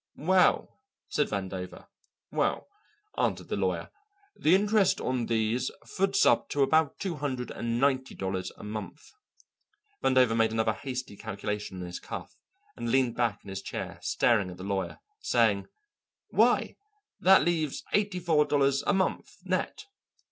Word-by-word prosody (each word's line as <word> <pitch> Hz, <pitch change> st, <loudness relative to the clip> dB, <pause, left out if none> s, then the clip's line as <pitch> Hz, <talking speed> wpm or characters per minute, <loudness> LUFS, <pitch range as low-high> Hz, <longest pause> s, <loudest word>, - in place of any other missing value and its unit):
"Well," 185 Hz, +4 st, +2 dB, 0.3 s
said 150 Hz, -, +1 dB
Vandover. 95 Hz, -2 st, -5 dB, 0.5 s
"Well," -, -, 0 dB, 0.5 s
answered -, -, 0 dB
the -, -, -1 dB
lawyer, -, -, -1 dB, 0.4 s
"the 165 Hz, +4 st, +4 dB
interest 205 Hz, 0 st, +3 dB
on 125 Hz, -2 st, -1 dB
these 115 Hz, +2 st, 0 dB, 0.2 s
foots 195 Hz, +1 st, +1 dB
up -, -, +3 dB
to 145 Hz, -, +2 dB
about 155 Hz, +1 st, +2 dB
two 185 Hz, -5 st, -3 dB
hundred 130 Hz, -4 st, -3 dB
and 115 Hz, 0 st, -2 dB
ninety 130 Hz, -1 st, +1 dB
dollars 95 Hz, -1 st, -3 dB
a -, -, -11 dB
month." 105 Hz, +7 st, -7 dB, 0.9 s
Vandover 130 Hz, -3 st, +4 dB
made 115 Hz, -1 st, +3 dB
another 110 Hz, 0 st, +1 dB
hasty 130 Hz, -5 st, -5 dB
calculation 100 Hz, -1 st, -5 dB
on -, -, -4 dB
his 90 Hz, 0 st, -6 dB
cuff, -, -, -7 dB, 0.4 s
and 115 Hz, -, -4 dB
leaned 130 Hz, -2 st, +2 dB
back 115 Hz, -4 st, 0 dB
in -, -, -11 dB
his 95 Hz, 0 st, -4 dB
chair -, -, -6 dB
staring 110 Hz, -6 st, +2 dB
at 90 Hz, -, -9 dB
the 95 Hz, -, -8 dB
lawyer, 100 Hz, -1 st, -2 dB, 0.2 s
saying: 110 Hz, -5 st, +2 dB, 0.6 s
"Why, -, -, +3 dB, 0.4 s
that 190 Hz, +1 st, +6 dB
leaves 160 Hz, -5 st, -1 dB
eighty 205 Hz, -3 st, +1 dB
four 160 Hz, -4 st, +3 dB
dollars 140 Hz, -2 st, +2 dB
a -, -, +4 dB
month, 190 Hz, -1 st, 0 dB, 0.2 s
net." 435 Hz, -, -2 dB
125 Hz, 150 wpm, -29 LUFS, 105-155 Hz, 0.9 s, that